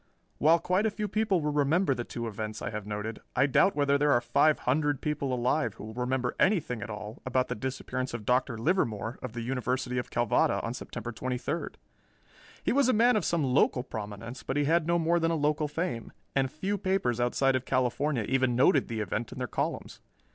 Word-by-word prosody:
While 160 +3 +6
quite 185 +5 +1
a - - +2
few 210 0 -3
people 205 -3 +1
will 150 0 0
remember 150 +3 +2
the 120 - -3
two 120 0 -5
events 110 0 -5
I - - -4
have 105 -1 -5
noted, 105 +1 -4 0.2
I 140 - +4
doubt 145 +8 +3
whether 140 -1 +2
there 145 0 +3
are 120 - +4
five 140 +5 +3
hundred 145 +1 +1
people 150 -3 -2
alive 120 -3 0
who - - -10
will 110 +1 -7
remember 125 +1 -1
anything 165 - +2
at 115 - -6
all 105 +2 -7
about 130 0 0
the - - 0
disappearance 130 +1 -4
of 110 -3 -7
Dr. 125 0 +1
Livermore 115 - 0
of 125 -3 -6
the 120 - -4
University 125 0 -1
of 125 - -5
Calvada 120 -2 +2
on - - -3
September 120 - -6
twenty 125 +2 -3
third. 150 +6 -4 0.9
He - - +1
was 275 -1 +3
a - - +4
man 240 +3 +4
of 210 - +1
some 170 -3 +1
local 130 -1 +2
prominence, 110 +3 -7
but 135 +4 -3
he 145 - +3
had 165 +2 +2
no 170 0 +3
more 170 +1 +2
than 165 0 +1
a 165 - +1
local 150 0 +1
fame, 155 -6 -3 0.2
and 135 -1 +2
few 195 +5 -2
papers 180 -12 0
outside 130 +2 +2
of 130 0 -1
California 130 0 0
even 130 +1 +1
noted 135 +9 +4
the 115 -2 -3
event 110 +3 -3
in - - -9
their 130 - -2
columns. - - -3
130 Hz, 215 wpm, -29 LUFS, 120-155 Hz, 0.9 s, While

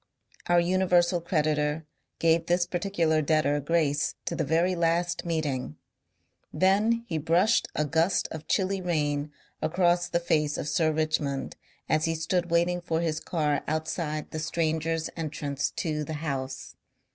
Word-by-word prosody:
Our 175 0 +5
universal 175 0 +2
creditor 155 -2 0 0.3
gave 165 0 +2
this 175 0 +2
particular 175 -3 0
debtor 145 -1 +2
grace 150 -1 +1
to - - -2
the - - 0
very 170 +3 +2
last 170 +1 0
meeting. 145 - -2 0.7
Then 215 +5 +2
he 160 -7 -2
brushed 175 +8 +3
a 150 - +1
gust 165 +5 +1
of 160 -1 -7
chilly 195 -1 0
rain 150 -4 -1 0.3
across 175 +1 +2
the 170 - +1
face 150 -3 +1
of - - -4
Sir 155 +2 +2
Richmond 155 -3 -1 0.3
as 155 0 +2
he 165 0 0
stood 175 +2 -1
waiting 175 +1 +2
for 165 -2 -1
his 160 -2 -1
car 150 -3 0
outside 155 0 -2
the 155 - -4
strangers' 160 0 -1
entrance 145 -4 -2
to 155 -2 -1
the 155 - -5
House. 135 -4 -4
160 Hz, 145 wpm, -27 LUFS, 150-175 Hz, 0.7 s, Our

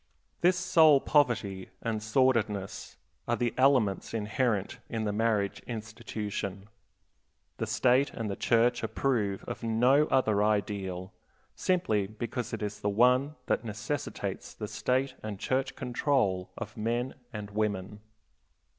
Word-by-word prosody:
This 180 +1 +4
soul 165 -6 +6
poverty 115 -11 +1
and 110 -2 -2
sordidness 110 -4 0 0.3
are 120 - +2
the 120 -1 -1
elements 130 -7 +2
inherent 105 -1 -1
in 115 -1 -2
the 105 -1 -1
marriage 105 -2 +1
institution. 105 -3 -5 0.9
The - - -2
State 130 +3 +3
and 115 - -4
the 100 - -2
Church 120 +3 +2
approve 110 -3 0
of - - -6
no 125 +6 +4
other 110 -6 +2
ideal, 100 -3 -1 0.4
simply 110 - +1
because 120 +3 -4
it 115 -2 -4
is 105 0 -4
the 105 - 0
one 125 +7 +3
that - - 0
necessitates 110 +5 -4
the - - -5
State 130 +1 0
and 105 -2 -5
Church 130 +1 -1
control 120 -7 0
of 110 -2 -6
men 120 +4 -1 0.2
and 105 -1 -6
women. 105 -1 -2
115 Hz, 130 wpm, -29 LUFS, 105-130 Hz, 0.9 s, soul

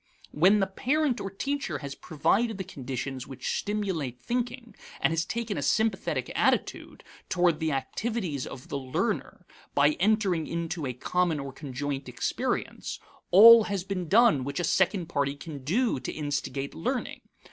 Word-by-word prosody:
When 190 +7 +4
the - - +3
parent 260 +7 0
or 195 - -3
teacher 280 +9 -3
has 140 -2 -6
provided 205 +10 0
the 190 - -3
conditions 135 -5 -5
which 135 -2 -3
stimulate 185 - -2
thinking 240 - -3 0.3
and - - +2
has 165 +1 0
taken 230 -5 -3
a - - -3
sympathetic 220 +10 0
attitude - - 0 0.3
toward 175 -3 +2
the 160 -1 0
activities 155 - -2
of 125 - -10
the 140 - -2
learner 130 -1 -2 0.3
by 145 +1 +5
entering 195 -5 +2
into 165 -3 -3
a 125 - -3
common 170 +5 0
or 140 -1 -6
conjoint 135 -1 -4
experience, 125 - -3 0.3
all 225 +4 +9
has 200 -3 -2
been 185 -3 -4
done 210 - +5
which 140 +3 -3
a - - -1
second 185 +1 +2
party 140 -4 -1
can 145 -2 -9
do 215 - +1
to 125 - -4
instigate 140 -2 -3
learning. 80 - -3
170 Hz, 155 wpm, -28 LUFS, 140-210 Hz, 0.3 s, all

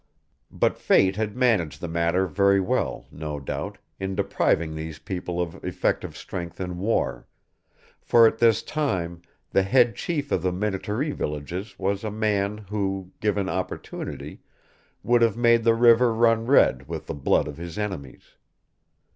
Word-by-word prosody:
But - - 0
Fate 95 0 +4
had 105 0 -2
managed 105 - +2
the 85 - -5
matter 85 +3 +1
very 100 +2 +3
well, 95 - -1
no 75 -1 -5
doubt, 70 - -5 0.2
in 95 0 -3
depriving 80 -3 +1
these 80 0 -6
people 90 0 -5
of 85 -2 -4
effective - - -2
strength 85 -3 -7
in 90 -1 -4
war; 100 - -1 0.7
for 115 -1 +5
at 115 - +2
this 115 -1 +4
time 90 - -2 0.3
the 95 - +4
head 120 +4 +3
chief 145 -4 -3
of 90 - +1
the 90 +1 0
Minnetaree 105 - -2
villages 90 - -5
was 100 +1 -1
a 110 - -2
man 105 -1 0
who, 95 -3 -2
given 105 -2 0
opportunity, 95 -1 -5 0.6
would 120 0 +3
have 115 -2 +3
made 115 -1 +4
the 115 0 +4
river 120 +1 +5
run 115 0 +3
red 65 - +4
with 80 0 -5
the - - -5
blood 70 - +1
of 75 - -7
his 85 +1 -7
enemies. 95 -11 -6
95 Hz, 155 wpm, -25 LUFS, 85-115 Hz, 0.7 s, for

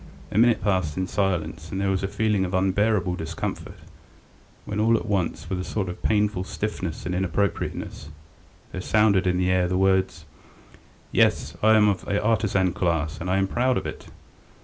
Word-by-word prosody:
A - - -2
minute 120 0 +4
passed 95 -6 0
in 95 - 0
silence, 80 -5 -2
and 95 - -3
there 100 0 +1
was 95 - 0
a 95 - -1
feeling 105 -1 0
of 90 0 -2
unbearable 95 0 +1
discomfort, 80 -1 -5 0.9
when 105 0 -4
all 115 +1 +4
at - - -5
once 100 -5 -2
with 95 - -3
a - - -2
sort 95 0 -3
of 90 - -7
painful 105 -3 +1
stiffness 95 -4 -4
and 90 - -2
inappropriateness, 95 -4 -2 0.6
there 90 - -5
sounded 100 -2 +3
in 90 0 +2
the 90 0 +1
air 90 -1 +2
the 90 +1 -1
words: 95 -3 +1 0.9
"Yes, 75 +6 +2
I 110 +1 +5
am 105 -1 +5
of 100 -2 0
the 100 +1 -1
artisan 105 -4 +1
class, 80 -4 -1
and 90 - -3
I 95 - +2
am 95 - +2
proud 125 +5 +1
of 95 - -3
it!" - - -7
95 Hz, 185 wpm, -24 LUFS, 90-105 Hz, 0.9 s, I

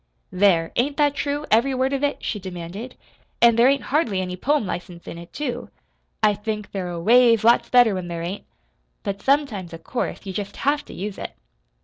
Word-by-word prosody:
"There, 180 -3 +3
ain't 280 +4 +1
that 290 -2 +3
true 290 +1 -2
every 245 +5 +3
word 260 +2 0
of 275 +1 -1
it?" 285 0 -1
she 210 - -2
demanded. 185 +5 -7 0.4
"An' 235 -1 +6
there 235 +2 +5
ain't 275 0 +1
hardly 235 - +2
any 180 -1 -3
poem 285 +5 +1
license 175 -1 -6
in 170 - -7
it, 170 - -12
too. 250 -5 -4 0.5
I 210 -1 +5
think 210 0 -5
they're 185 -3 -3
a 170 -1 -4
ways 230 +3 +5
lots 235 +1 +4
better 245 -4 +5
when 185 -2 -4
there 170 -1 -4
ain't; 185 +4 -5 0.6
but 200 -2 -4
sometimes, 260 - 0
of 165 0 -10
course, 250 - -3
you 190 - -5
jest 200 +1 -5
have 290 +1 +2
to - - -11
use 200 +1 -5
it. - - -6
215 Hz, 205 wpm, -23 LUFS, 185-260 Hz, 0.6 s, An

